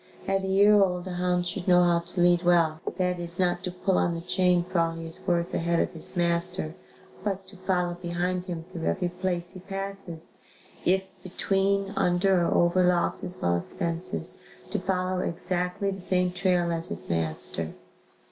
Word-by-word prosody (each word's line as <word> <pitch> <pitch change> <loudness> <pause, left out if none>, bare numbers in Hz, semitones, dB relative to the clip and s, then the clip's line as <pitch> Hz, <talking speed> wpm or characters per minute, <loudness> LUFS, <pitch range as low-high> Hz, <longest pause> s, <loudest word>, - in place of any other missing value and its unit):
At 195 0 +1
a - - -2
year 200 +2 +5
old 180 -2 +1
a - - -4
hound 180 0 0
should 180 +1 -4
know 180 -1 +6
how 170 -1 +3
to 170 +1 -4
lead 175 0 +5
well, 165 -3 +3 0.2
that 180 -1 0
is 170 0 -6
not 175 -1 +1
to - - -2
pull 185 +1 0
on 170 - +1
the 165 - -5
chain 180 0 +2
for 180 0 -1
all 165 0 +1
he 165 0 -7
is 165 - -7
worth 170 -1 +1
ahead 170 0 +1
of - - 0
his 165 +2 +1
master 170 -1 0 0.5
but 195 -2 -3
to 195 - -14
follow 180 -2 0
behind 175 +1 -2
him 170 -3 -5
through 170 -1 -6
every 185 -2 0
place 180 -1 -1
he 185 - -9
passes, 195 -3 -4 0.5
if 190 +2 +3 0.2
between, 195 +2 0
under 180 0 +3
or - - +1
over 175 +2 +3
logs 180 -1 +1
as 180 +1 -5
well 85 0 +1
as 85 - -2
fences, 165 - 0 0.3
to - - 0
follow 185 -1 -1
exactly 180 +3 -1
the 195 - -6
same 180 0 +1
trail 180 -1 +1
as 165 +1 -2
his - - -4
master. 80 0 0
180 Hz, 190 wpm, -27 LUFS, 170-185 Hz, 0.5 s, know